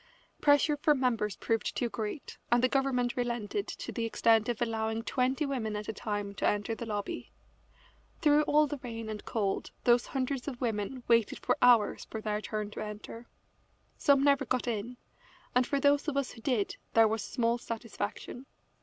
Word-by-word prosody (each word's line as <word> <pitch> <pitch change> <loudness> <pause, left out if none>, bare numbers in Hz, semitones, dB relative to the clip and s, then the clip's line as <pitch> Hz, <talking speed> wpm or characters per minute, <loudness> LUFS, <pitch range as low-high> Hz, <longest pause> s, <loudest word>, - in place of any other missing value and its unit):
Pressure 290 +1 +4
from 300 -3 +3
members 230 -6 0
proved 225 -1 -1
too 240 - 0
great, 225 +4 -5
and 240 +1 +4
the - - +6
government 255 -2 +1
relented 240 - -2
to - - -6
the 235 - -3
extent 225 0 +3
of 235 - -1
allowing 225 -1 -1
twenty 260 +4 0
women 240 -6 -2
at 210 0 -5
a - - -3
time 205 -1 -3
to - - 0
enter 205 +2 0
the 230 +1 -6
lobby. 205 -2 -4 0.9
Through 300 -2 +5
all 300 +1 +4
the 290 -1 -5
rain 230 -3 -6
and 210 -1 -5
cold 200 -4 -1
those 240 0 +4
hundreds 265 0 -2
of 255 -4 -4
women 230 +2 -2
waited 230 -3 +3
for - - +1
hours 240 -4 +4
their 215 -1 -3
turn 215 -1 -4
to - - -5
enter. 215 +2 -8 0.7
Some 280 -2 +4
never 280 -1 +4
got 255 -1 -1
in, 235 +2 -3 0.6
and 250 0 +3
for 280 - 0
those 285 +1 +3
of 290 -2 -1
us 280 -2 0
who 230 - -12
did 230 -5 0 0.2
there 225 -1 +7
was 220 -1 -1
small 235 -1 0
satisfaction. 230 +2 -5
235 Hz, 180 wpm, -30 LUFS, 220-265 Hz, 0.9 s, there